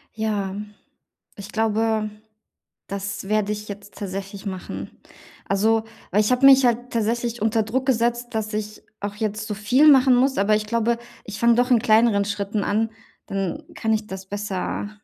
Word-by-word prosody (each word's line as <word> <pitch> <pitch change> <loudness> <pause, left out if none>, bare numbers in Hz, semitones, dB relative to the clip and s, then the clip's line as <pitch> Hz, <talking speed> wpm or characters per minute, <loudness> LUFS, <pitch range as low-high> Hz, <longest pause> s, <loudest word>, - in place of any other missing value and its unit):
Ja, 210 -3 -2 0.8
ich 200 +1 -9
glaube, 220 0 +1 0.8
das 200 0 -5
werde 210 -1 +1
ich 210 0 -5
jetzt 200 0 -9
tatsächlich 195 +1 -6
machen. 185 -2 -6 0.6
Also, 220 +3 +2 0.3
weil 210 +3 +4
ich 210 - +1
habe 250 +2 +4
mich 270 -1 +8
halt 245 +1 0
tatsächlich 235 +1 -1
unter 220 +1 +2
Druck 250 +5 -2
gesetzt, 240 -1 0
dass 215 0 -2
ich 210 0 -5 0.2
auch 205 0 -4
jetzt 215 0 -3
so 210 - -3
viel 245 +9 +4
machen 260 -2 +6
muss. 265 +2 +2
Aber 200 +2 +3
ich 210 0 -2
glaube, 230 +1 +1 0.3
ich 210 0 -7
fange 235 +1 +5
doch 245 +2 +2
in 240 - +6
kleineren 220 -2 +4
Schritten 205 0 -2
an. 220 +3 0 0.4
Dann 195 -2 -3
kann 220 0 0
ich 215 0 -1
das 190 -1 -8
besser 205 0 -3
215 Hz, 170 wpm, -23 LUFS, 205-235 Hz, 0.8 s, mich